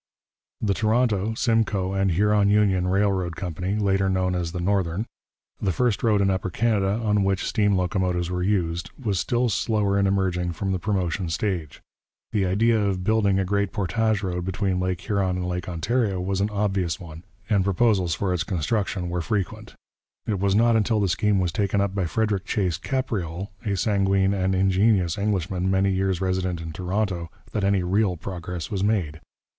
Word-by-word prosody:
The 100 Hz, -3 st, +1 dB
Toronto, 110 Hz, -1 st, +1 dB
Simcoe 110 Hz, -5 st, +1 dB
and 95 Hz, 0 st, +1 dB
Huron 105 Hz, +2 st, +3 dB
Union 100 Hz, -3 st, +3 dB
Railroad 95 Hz, -3 st, +1 dB
Company 90 Hz, +2 st, -3 dB
later 95 Hz, -2 st, +1 dB
known 95 Hz, -1 st, +1 dB
as 85 Hz, -2 st, -2 dB
the 90 Hz, -, -4 dB
Northern 95 Hz, +1 st, 0 dB, 0.6 s
the 95 Hz, -, +1 dB
first 120 Hz, +2 st, 0 dB
road 105 Hz, -3 st, +3 dB
in 95 Hz, -1 st, +3 dB
Upper 95 Hz, 0 st, -1 dB
Canada 105 Hz, 0 st, +1 dB
on 105 Hz, -1 st, +2 dB
which 95 Hz, -1 st, 0 dB
steam 105 Hz, -2 st, +2 dB
locomotives 90 Hz, -2 st, 0 dB
were 90 Hz, 0 st, -2 dB
used, 90 Hz, -3 st, 0 dB
was 105 Hz, -9 st, -1 dB
still 120 Hz, +5 st, +1 dB
slower 105 Hz, -2 st, +1 dB
in 100 Hz, -, +3 dB
emerging 90 Hz, -3 st, 0 dB
from 95 Hz, +4 st, -3 dB
the 95 Hz, -, -1 dB
promotion 95 Hz, -3 st, -1 dB
stage. 85 Hz, -4 st, -3 dB, 0.5 s
The 100 Hz, -4 st, +1 dB
idea 110 Hz, +5 st, +3 dB
of 95 Hz, -2 st, -1 dB
building 100 Hz, -1 st, +2 dB
a 95 Hz, -, +1 dB
great 100 Hz, +1 st, 0 dB
portage 110 Hz, +1 st, 0 dB
road 90 Hz, -2 st, -2 dB
between 95 Hz, 0 st, -1 dB
Lake 90 Hz, -1 st, -1 dB
Huron 95 Hz, -4 st, 0 dB
and 90 Hz, -1 st, -3 dB
Lake 90 Hz, 0 st, -3 dB
Ontario 100 Hz, +3 st, 0 dB
was 95 Hz, +1 st, -1 dB
an 100 Hz, -, +1 dB
obvious 100 Hz, -5 st, -1 dB
one, 80 Hz, -3 st, -10 dB, 0.3 s
and 100 Hz, -3 st, +2 dB
proposals 95 Hz, -3 st, +2 dB
for 95 Hz, 0 st, -1 dB
its 90 Hz, -, 0 dB
construction 95 Hz, +1 st, -1 dB
were 90 Hz, 0 st, -2 dB
frequent. 100 Hz, -1 st, -3 dB, 0.5 s
It 105 Hz, -3 st, -1 dB
was 100 Hz, 0 st, +2 dB
not 115 Hz, +1 st, +4 dB
until 110 Hz, 0 st, +2 dB
the 100 Hz, -2 st, +1 dB
scheme 105 Hz, +4 st, +2 dB
was 90 Hz, -2 st, 0 dB
taken 100 Hz, +2 st, 0 dB
up 100 Hz, -1 st, 0 dB
by 95 Hz, -3 st, -1 dB
Frederick 105 Hz, 0 st, -1 dB
Chase 90 Hz, -6 st, -1 dB
Capreol, 100 Hz, -8 st, -3 dB
a 100 Hz, -3 st, -1 dB
sanguine 95 Hz, 0 st, +2 dB
and 95 Hz, -1 st, 0 dB
ingenious 95 Hz, -1 st, +2 dB
Englishman 95 Hz, -2 st, -1 dB
many 95 Hz, +1 st, +2 dB
years 95 Hz, -1 st, 0 dB
resident 95 Hz, -2 st, -1 dB
in 80 Hz, 0 st, -6 dB
Toronto, 90 Hz, -1 st, -2 dB, 0.2 s
that 105 Hz, -, -2 dB
any 100 Hz, -2 st, +2 dB
real 95 Hz, 0 st, +1 dB
progress 90 Hz, -2 st, -6 dB
was 100 Hz, -2 st, -1 dB
made. 95 Hz, -8 st, 0 dB
95 Hz, 180 wpm, -24 LUFS, 90-105 Hz, 0.6 s, not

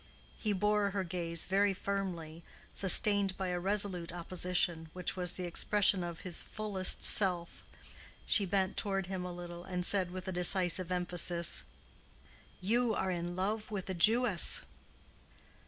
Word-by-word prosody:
He 215 Hz, -, -2 dB
bore 210 Hz, +1 st, -1 dB
her 195 Hz, -1 st, -4 dB
gaze 170 Hz, -2 st, 0 dB
very 195 Hz, +1 st, 0 dB
firmly, 180 Hz, -5 st, -6 dB, 0.3 s
sustained 200 Hz, 0 st, +3 dB
by 190 Hz, -1 st, -4 dB
a 180 Hz, 0 st, -3 dB
resolute 190 Hz, -2 st, -1 dB
opposition, 175 Hz, -1 st, -2 dB
which 180 Hz, 0 st, -5 dB
was 180 Hz, -2 st, -1 dB
the 185 Hz, -, -7 dB
expression 190 Hz, +2 st, +1 dB
of 170 Hz, -1 st, -8 dB
his 180 Hz, -3 st, -2 dB
fullest 205 Hz, -4 st, +1 dB
self. 180 Hz, -4 st, +4 dB, 0.6 s
She 200 Hz, -3 st, +1 dB
bent 190 Hz, 0 st, -2 dB
toward 195 Hz, -2 st, -3 dB
him 185 Hz, 0 st, -6 dB
a 180 Hz, -, -7 dB
little, 175 Hz, 0 st, -10 dB
and 180 Hz, -1 st, -4 dB
said, 190 Hz, -2 st, +1 dB
with 185 Hz, +1 st, -9 dB
a -, -, -4 dB
decisive 180 Hz, 0 st, +2 dB
emphasis, 175 Hz, -1 st, -2 dB, 1.0 s
"You 230 Hz, +3 st, 0 dB
are 190 Hz, -, -3 dB
in 175 Hz, 0 st, -5 dB
love 210 Hz, +4 st, -4 dB
with 195 Hz, -3 st, -6 dB
a -, -, -4 dB
Jewess." 210 Hz, +2 st, +6 dB
185 Hz, 145 wpm, -31 LUFS, 175-200 Hz, 1.0 s, Jewess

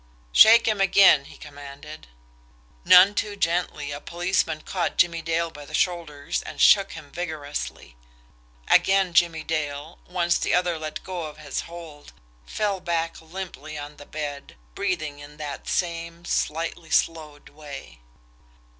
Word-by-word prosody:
"Shake 230 Hz, -, +8 dB
him 215 Hz, -3 st, +1 dB
again!" 190 Hz, -7 st, +6 dB
he -, -, -14 dB
commanded. 145 Hz, -, -11 dB, 0.8 s
None 185 Hz, -, +8 dB
too 210 Hz, 0 st, -2 dB
gently, 165 Hz, -5 st, -1 dB
a 145 Hz, 0 st, -6 dB
policeman 170 Hz, -2 st, -1 dB
caught 180 Hz, 0 st, -2 dB
Jimmie 170 Hz, -1 st, +3 dB
Dale 165 Hz, 0 st, -1 dB
by 145 Hz, -1 st, -11 dB
the 145 Hz, -, -6 dB
shoulder 165 Hz, -5 st, -2 dB, 0.2 s
and -, -, -9 dB
shook 195 Hz, -2 st, +5 dB
him 150 Hz, -3 st, -11 dB
vigorously 150 Hz, -, -5 dB, 0.7 s
again 190 Hz, -2 st, +4 dB
Jimmie 170 Hz, -2 st, +3 dB
Dale, 150 Hz, -1 st, -4 dB
once 175 Hz, -1 st, +1 dB
the -, -, +1 dB
other 175 Hz, -2 st, 0 dB
let 155 Hz, -1 st, -6 dB
go 175 Hz, -4 st, -5 dB
his 155 Hz, -2 st, -4 dB
hold, 165 Hz, -4 st, -11 dB, 0.3 s
fell 205 Hz, -3 st, -1 dB
back 165 Hz, -2 st, -2 dB
limply 160 Hz, -3 st, -8 dB
on 145 Hz, 0 st, -8 dB
the 145 Hz, -, -13 dB
bed, 145 Hz, -2 st, -6 dB, 0.2 s
breathing 155 Hz, -, -2 dB
in 145 Hz, +1 st, -12 dB
that 150 Hz, -2 st, -7 dB
same, 170 Hz, -1 st, -3 dB
slightly 165 Hz, 0 st, -2 dB
slowed 155 Hz, -3 st, -1 dB
way. 145 Hz, -, -11 dB
165 Hz, 135 wpm, -24 LUFS, 150-175 Hz, 0.8 s, Shake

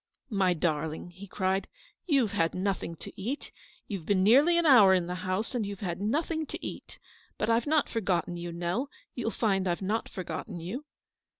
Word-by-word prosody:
" -, -, -49 dB, 0.2 s
My 180 Hz, -1 st, +3 dB
darling," 160 Hz, +1 st, -1 dB
he 190 Hz, +3 st, -11 dB
cried, 190 Hz, +1 st, 0 dB, 0.2 s
" -, -, -39 dB
you've 270 Hz, -, +3 dB
had 165 Hz, 0 st, +1 dB
nothing 185 Hz, -3 st, -1 dB
to -, -, -9 dB
eat; 255 Hz, +9 st, -4 dB, 0.4 s
you've 195 Hz, -6 st, -4 dB
been 190 Hz, -2 st, +3 dB
nearly 280 Hz, -, +6 dB
an 340 Hz, -, +2 dB
hour 215 Hz, -10 st, +8 dB
in 180 Hz, -2 st, +1 dB
the 180 Hz, -, -3 dB
house, 185 Hz, +5 st, -2 dB
and 245 Hz, -3 st, 0 dB
you've 200 Hz, -1 st, -5 dB
had 180 Hz, -2 st, -3 dB
nothing 310 Hz, +8 st, 0 dB
to -, -, -6 dB
eat. -, -, -7 dB, 0.4 s
But 220 Hz, -, +1 dB
I've 230 Hz, +5 st, +2 dB
not 310 Hz, 0 st, +3 dB
for 225 Hz, -, -2 dB
gotten 175 Hz, -3 st, 0 dB
you, 170 Hz, 0 st, -5 dB
Nell; 175 Hz, +11 st, -2 dB, 0.2 s
you'll 240 Hz, -2 st, -2 dB
find 195 Hz, -5 st, +1 dB
I've 175 Hz, +2 st, -1 dB
not 215 Hz, +4 st, -1 dB
forgotten 185 Hz, +1 st, -5 dB
you." 210 Hz, -, -5 dB
195 Hz, 200 wpm, -29 LUFS, 180-235 Hz, 0.4 s, hour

